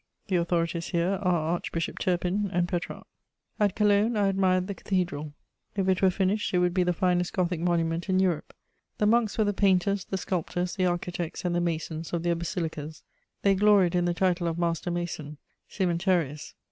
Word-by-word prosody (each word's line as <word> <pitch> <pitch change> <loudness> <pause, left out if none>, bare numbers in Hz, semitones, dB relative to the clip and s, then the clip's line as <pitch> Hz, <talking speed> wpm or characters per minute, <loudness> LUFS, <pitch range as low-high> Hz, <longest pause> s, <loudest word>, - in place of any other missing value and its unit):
The 190 - +1
authorities 170 -1 0
here 180 +2 0
are 170 -4 +1
Archbishop 165 -1 -3
Turpin 185 +3 0
and 175 -2 +1
Petrarch. 175 -1 -4 0.5
At 205 -3 +2
Cologne 210 +2 +3
I 200 -1 +3
admired 185 -1 +2
the 200 - -4
cathedral: 175 -7 -2 0.4
if 195 -2 0
it 185 -1 +2
were 190 - +5
finished, 195 +3 0
it - - +4
would 180 0 +2
be 185 - +2
the 180 0 +2
finest 180 0 0
Gothic 180 -2 0
monument 170 +1 0
in 185 - +3
Europe. 180 -5 0 0.5
The 210 - +1
monks 220 -1 +2
were 220 - +4
the 205 0 0
painters, 195 0 +2
the 190 - -3
sculptors, 180 0 -2
the 185 -2 +1
architects, 175 -1 -3
and 175 - +1
the 175 - +1
masons 165 -1 -3
of 170 -1 -1
their 175 0 +2
basilicas; 165 -3 -4 0.4
they 200 - +5
gloried 195 -3 +4
in 175 -1 +2
the 175 0 0
title 180 -1 +1
of 165 0 -2
master 170 0 -1
mason, 165 -4 -4 0.3
_cœmentarius. 175 -5 -1
180 Hz, 185 wpm, -27 LUFS, 170-190 Hz, 0.5 s, were